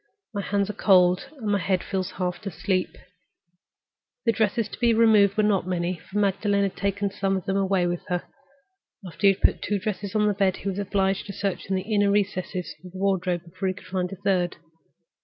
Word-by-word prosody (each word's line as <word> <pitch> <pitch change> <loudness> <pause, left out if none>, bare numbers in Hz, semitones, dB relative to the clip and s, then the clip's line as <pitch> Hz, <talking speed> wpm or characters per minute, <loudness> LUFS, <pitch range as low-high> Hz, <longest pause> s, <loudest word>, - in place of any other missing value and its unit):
"My 200 - -2
hands 200 0 0
are 210 - -4
cold, 185 0 +4
and 235 - -8
my 200 - +2
head 185 -1 0
feels 190 -1 -2
half 180 +2 -3
asleep." 185 +1 -1 1.3
The 230 - +5
dresses 220 0 +1
to - - -9
be 235 -2 +3
removed 215 -3 +5
were 215 - +4
not 200 -3 +2
many, 180 0 -1
for 190 +5 -7
Magdalen 200 0 +2
had 195 - -1
taken 200 0 -1
some 195 0 0
of 185 - -6
them 195 - -1
away 195 -2 +2
with 175 0 -1
her. 180 -1 -1 0.8
After 185 +3 0
he 195 - +7
had 190 - -15
put - - +3
two 205 - 0
dresses 200 0 -4
on 210 -1 +3
the 210 - +3
bed, 195 -2 +1
he - - +1
was 195 +1 -3
obliged 195 -1 0
to 200 - -6
search 195 -1 -3
in 190 - 0
the 185 - -1
inner 205 -1 +2
recesses 190 -3 -1
of 180 - -10
the - - -8
wardrobe 185 -3 0
before 185 +3 -4
he 185 - -1
could - - -13
find 180 -1 -2
a - - -5
third. 180 -2 0
195 Hz, 215 wpm, -25 LUFS, 185-205 Hz, 1.3 s, he